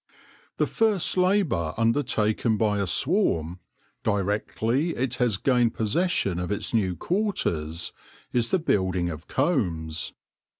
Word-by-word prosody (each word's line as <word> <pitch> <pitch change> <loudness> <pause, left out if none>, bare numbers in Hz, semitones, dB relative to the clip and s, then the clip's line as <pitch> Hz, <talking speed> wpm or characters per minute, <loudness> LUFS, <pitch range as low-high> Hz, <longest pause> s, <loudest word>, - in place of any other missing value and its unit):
The - - +2
first 215 -5 +1
labour 180 - +1
undertaken 115 -2 +1
by 105 -1 +1
a 100 - 0
swarm, 90 - +1 0.4
directly 110 - 0
it 130 0 -1
has 120 -6 +1
gained 120 -1 +2
possession 110 - 0
of 90 +2 -3
its 105 - -2
new 95 -6 +1
quarters, 85 - -1 0.4
is 120 -1 +1
the - - +3
building 95 - 0
of 80 0 -9
combs. 85 - -1
110 Hz, 120 wpm, -26 LUFS, 90-145 Hz, 0.4 s, the